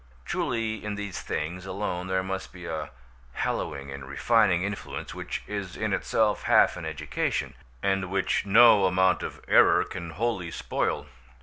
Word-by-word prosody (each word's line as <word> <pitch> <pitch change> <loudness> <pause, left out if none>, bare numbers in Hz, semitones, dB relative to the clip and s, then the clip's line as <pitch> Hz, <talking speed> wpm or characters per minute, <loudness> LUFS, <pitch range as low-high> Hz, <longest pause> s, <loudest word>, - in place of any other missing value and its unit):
Truly 115 -3 -2
in 105 -1 -3
these 100 -2 -5
things 90 +5 -4
alone 95 -2 -3
there 95 0 0
must 95 0 -4
be 90 -1 -10
a 80 -2 -4 0.4
hallowing 70 +2 -3
and 70 0 -7
refining 95 - +3
influence 100 +1 -5
which - - -5
is 100 -3 -5
in 110 -2 -1
itself 105 +2 +1
half - - +4
an - - -6
education, 75 -2 -2 0.3
and 95 -1 +1
which 95 0 +1
no 105 -1 +7
amount 90 0 +3
of - - -6
error - - +6
can 85 -2 -7
wholly 95 0 -2
spoil. - - -2
95 Hz, 150 wpm, -27 LUFS, 90-105 Hz, 0.4 s, no